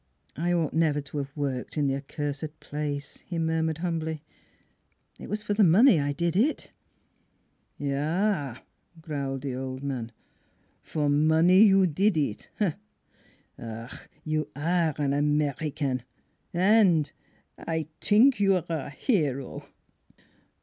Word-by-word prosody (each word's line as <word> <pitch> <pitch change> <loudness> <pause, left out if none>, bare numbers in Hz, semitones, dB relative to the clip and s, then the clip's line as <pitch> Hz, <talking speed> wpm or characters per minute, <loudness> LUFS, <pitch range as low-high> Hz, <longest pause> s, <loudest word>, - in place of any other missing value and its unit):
" - - -45
I 170 +5 -1
ought 165 -4 0
never 155 -2 +2
to 145 +1 -5
have 140 0 -5
worked 135 -1 -3
in 145 - +2
the 135 - +1
accursed 145 +2 -5
place," 145 -1 -5
he 175 - -5
murmured 160 -1 0
humbly. 160 -3 -3 0.5
" - - -37
It - - -9
was 210 +1 -3
for 205 - -1
money 195 - +6
I 145 0 0
did 170 +3 -1
it." 250 +11 +1 0.6
' - - -44
Yaf 145 - -1 0.2
" 165 - -22
growled 140 -4 -3
the 135 -2 -3
old 130 +1 -5
man, 125 -5 -4 0.7
"for 150 -2 -2
money 160 +6 +5
you 195 -3 +6
did 185 +3 +2
it! 140 -8 -2 1.1
Ach! 115 +1 -8
You 155 -1 -1
are 165 0 +1
an 140 -2 0
American, 145 -2 0 0.5
an' 185 -3 +4 0.5
I 160 -2 -3
t'ink 225 +3 +4
you 195 -1 +4
are 180 - -1
a 160 -4 -3
hero! 145 - -1
155 Hz, 135 wpm, -27 LUFS, 140-175 Hz, 1.1 s, money